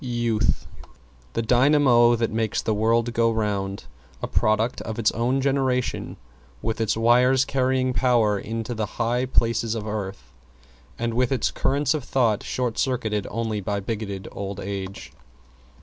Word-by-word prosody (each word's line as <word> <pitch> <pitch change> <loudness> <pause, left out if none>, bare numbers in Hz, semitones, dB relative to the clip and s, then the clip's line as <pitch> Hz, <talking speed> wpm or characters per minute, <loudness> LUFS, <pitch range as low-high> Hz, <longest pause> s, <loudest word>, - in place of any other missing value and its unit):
=YOUTH= 120 -3 0 0.7
The 115 - -1
dynamo 125 -1 +5
that 115 -1 -1
makes 110 -1 -1
the 110 - 0
world 115 +2 +1
go 115 -1 +3
round; 100 -3 -2 0.4
a - - 0
product 110 +3 +1
of 110 - -5
its 115 -2 +2
own 125 +4 0
generation, 130 -2 0 0.5
with 115 0 -2
its 110 0 0
wires 125 +3 +4
carrying 130 -1 +1
Power 115 -6 +2
into 115 +3 -4
the 110 -2 -2
high 120 +2 0
places 115 -2 +1
of 110 -2 -4
Earth 95 - -5 0.6
and 115 0 -2
with 125 +2 +1
its 135 - +1
currents 140 +1 +1
of 155 -4 -3
Thought 120 -6 +1
short 125 -3 -2
circuited 110 -6 -1
only 110 -2 -2
by 100 +1 -2
bigoted 100 -2 -5
Old 100 0 -5
Age. 95 -6 -6
115 Hz, 150 wpm, -24 LUFS, 105-125 Hz, 0.7 s, dynamo